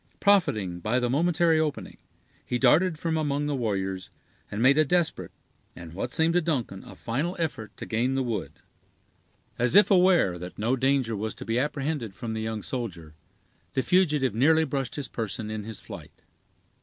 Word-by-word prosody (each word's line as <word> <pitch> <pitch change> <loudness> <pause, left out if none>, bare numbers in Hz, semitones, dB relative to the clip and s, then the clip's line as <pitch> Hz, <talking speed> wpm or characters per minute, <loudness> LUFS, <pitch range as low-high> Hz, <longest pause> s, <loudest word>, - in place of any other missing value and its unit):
Profiting 145 - +2
by 110 +7 0
the 120 -1 0
momentary 165 +2 +3
opening, 155 -2 -3 0.5
he 125 - -2
darted 155 +7 +4
from 160 0 -1
among 145 -1 -1
the 145 - -1
warriors, 95 -7 -2 0.4
and 105 - -5
made 135 +5 +5
a - - +6
desperate, 170 +2 0 0.5
and 85 -1 -10
what 100 +7 -4
seemed 160 +1 +2
to 175 - +3
Duncan 130 - -2
a - - -12
final 150 +11 -2
effort 135 - -4
to - - -6
gain 120 +4 0
the 135 - +1
wood. 105 - -3 1.1
As 125 +7 +2
if 205 +1 +7
aware 180 - +4
that 90 +1 -8
no 115 +5 +1
danger 130 -3 +1
was 110 +2 -3
to - - -9
be 115 +1 0
apprehended 140 -6 -2
from 115 -2 -5
the 110 - -3
young 110 -2 -4
soldier, 90 - -5 0.6
the 130 - 0
fugitive 150 - +2
nearly 160 +8 +4
brushed 135 -3 -3
his 145 -2 -4
person 110 -1 -4
in 110 -1 -5
his 110 -3 -7
flight. - - -11
130 Hz, 180 wpm, -26 LUFS, 110-155 Hz, 1.1 s, if